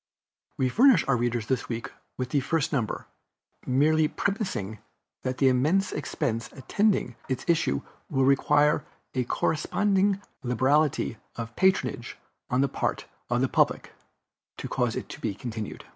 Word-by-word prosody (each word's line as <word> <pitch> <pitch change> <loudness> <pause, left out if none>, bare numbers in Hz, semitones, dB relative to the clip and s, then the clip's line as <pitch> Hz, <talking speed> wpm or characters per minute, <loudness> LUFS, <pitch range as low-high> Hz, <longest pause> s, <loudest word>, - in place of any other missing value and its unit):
We 130 - +2
furnish 235 - +5
our 135 - +3
readers 120 -2 0
this 130 +1 -1
week 115 -1 -4 0.3
with 130 -1 -3
the 140 - +2
first 150 +3 0
number, 120 -6 -1 0.6
merely 155 +4 +3
premising 185 - -2 0.4
that 130 0 -3
the 135 - +4
immense 150 +10 +2
expense 115 -7 -2
attending 140 - 0
its 130 -1 -2
issue 160 - +1 0.3
will 135 -1 +2
require 145 +2 +4 0.3
a 125 -1 0
corresponding 195 - +1 0.2
liberality 130 +1 +1 0.2
of 115 0 -6
patronage 190 +1 +1 0.3
on 125 +1 +2
the 140 - +3
part - - -2 0.2
of 120 +1 +1
the 130 - +3
Public, - - +1 0.7
to - - -5
cause - - 0
it - - -4
to - - -9
be 100 - -2
continued. 110 -3 -6
135 Hz, 145 wpm, -27 LUFS, 120-160 Hz, 0.7 s, furnish